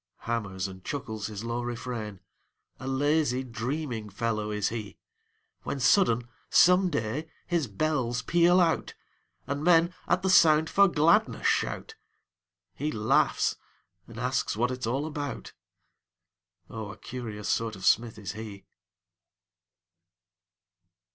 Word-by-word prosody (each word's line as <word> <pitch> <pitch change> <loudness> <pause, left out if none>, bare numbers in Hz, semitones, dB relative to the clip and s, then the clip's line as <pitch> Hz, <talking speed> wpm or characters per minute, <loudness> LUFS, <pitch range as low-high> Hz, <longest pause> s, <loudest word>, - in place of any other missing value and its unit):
Hammers 100 -5 -3
and 95 -1 -11
chuckles 110 -7 -4
his 105 -1 -7
low 115 +1 -2
refrain, 120 -4 -5 0.6
A 130 - -7
lazy, 135 -1 +1
dreaming 125 -2 -4
fellow 105 +1 -2
is 105 -1 0
he: 110 -4 -6 0.6
When 140 - -4
sudden, 120 - +3 0.2
some 180 +1 +5
day, 145 +2 -3 0.2
his 170 -6 0
bells 125 +1 -1
peal 175 +5 +4
out, 170 -3 +1 0.5
And 140 +1 -3
men, 170 0 +4
at 185 - +1
the 190 - +1
sound, 160 -3 +5
for 200 0 +6
gladness 165 -1 +2
shout; - - 0 0.8
He 150 +2 -3
laughs 110 -3 +2 0.5
and - - -10
asks - - -1
what 120 +2 +1
it's 125 -2 -4
all 135 +5 -1
about; 145 -3 -5 1.1
Oh, 110 -2 -7
a - - -12
curious 110 -5 -7
sort 115 -2 0
of 95 -1 -8
smith 115 0 +3
is 100 -4 -5
he. 105 -3 -9
120 Hz, 125 wpm, -28 LUFS, 110-155 Hz, 1.1 s, for